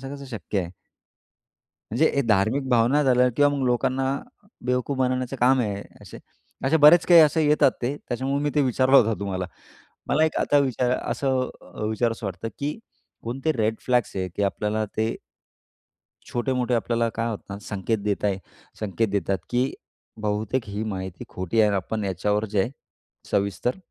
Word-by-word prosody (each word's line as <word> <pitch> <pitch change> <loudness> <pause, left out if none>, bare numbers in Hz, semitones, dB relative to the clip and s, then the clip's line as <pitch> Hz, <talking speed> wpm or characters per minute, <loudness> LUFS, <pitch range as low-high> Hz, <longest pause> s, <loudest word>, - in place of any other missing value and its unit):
कसं 140 -1 -9
शक्य 105 -2 -3
आहे? 85 -2 -5 1.2
म्हणजे 145 +9 +3
हे 140 - +3
धार्मिक 110 +7 +2
भावना 125 +4 +4
झाल्या 125 -1 +4
किंवा 145 +1 +5
मग 135 - -1
लोकांना 130 +2 +1 0.6
बेवकूफ 125 +2 0
बनवण्याचं 130 0 0
काम 130 +2 +4
आहे 105 -5 0
हे 100 - -7 0.2
असे. - - -11 0.5
असे 140 +4 +3
बरेच 155 +3 +7
काही 175 -2 +8
असे 155 +1 +4
येतात, 150 -2 +4
ते 125 +4 -1
त्याच्यामुळे 135 +3 -2
मी 145 - +1
ते 145 - +4
विचारला 130 +1 +4
होत 115 -3 +4
तुम्हाला. 95 -2 -3 0.6
मला 155 +2 +3
एक 160 - -1
आता 145 - +3
विचार 130 -3 +1
असं 130 -2 -1
अ, 90 - -10
विचारावसं 115 +1 -1
वाटतं 95 +4 -5
की, 145 +6 -3 0.4
कोणते 135 +7 -1
रेड 110 -4 0
फ्लॅग्स 125 -5 +1
आहेत 95 -1 -2
की 105 - 0
आपल्याला 105 +2 0
ते 110 +1 0 1.2
छोटे-मोठे, 125 0 0
आपल्याला 115 0 +1
काय 115 +1 -1
होतं 105 - -6
ना, - - -7
संकेत 105 +2 -2
देताय, 100 -1 0 0.4
संकेत 110 +2 0
देतात, 100 -1 -1
की 125 +2 +1 0.5
बहुतेक 105 +4 -1
ही 100 +2 -3
माहिती 95 -4 -5
खोटी 95 +5 -1
आहे 105 - +5
आणि 100 - +1
आपण 105 +3 -3
याच्यावर 105 +3 0
जे 100 - +4
आहे 105 - 0 0.6
सविस्तर 100 +5 0
120 Hz, 165 wpm, -24 LUFS, 105-130 Hz, 1.2 s, काही